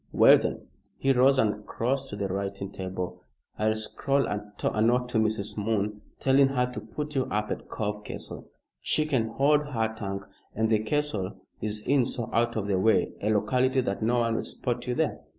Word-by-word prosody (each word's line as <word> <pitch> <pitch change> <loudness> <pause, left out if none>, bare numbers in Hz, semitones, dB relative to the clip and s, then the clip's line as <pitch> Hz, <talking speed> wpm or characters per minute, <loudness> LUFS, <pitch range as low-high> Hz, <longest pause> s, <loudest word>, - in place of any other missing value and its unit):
"Well, - - +7
then" - - -3 0.3
he 135 0 +3
rose 135 +2 +5
and 105 -3 +1
crossed 135 +3 -1
to - - -5
the 100 -1 -2
writing 100 +1 -3
table 90 -2 -5 0.4
"I'll 110 0 +2
scrawl 135 +5 0
a 105 - -1 0.4
note 125 +2 +3
to 115 - +1
Mrs. 110 -1 0
Moon 105 -1 -1 0.2
telling 135 +1 +5
her 125 -2 +1
to 110 - -5
put 150 +8 -5
you 130 -2 +1
up 105 0 -2
at - - -5
Cove 105 -1 -3
Castle. - - -7 0.3
She 155 - +1
can 130 -7 +1
hold 140 +6 +3
her 115 -6 -1
tongue, 100 -2 -4 0.3
and 110 +1 +1
the 110 - +4
castle 110 -5 -1 0.3
is 105 0 -3
in 135 -3 +3
so 120 -4 -4
out 120 +1 +2
of 110 -3 -1
the 100 -2 +1
way 110 +3 +3
a 105 - 0
locality 130 +5 +2
that 100 -5 -2
no 120 +2 +2
one 115 -1 +1
will - - 0
spot 125 -1 -3
you 125 - 0
there. 160 +1 0
110 Hz, 195 wpm, -27 LUFS, 105-130 Hz, 0.4 s, Well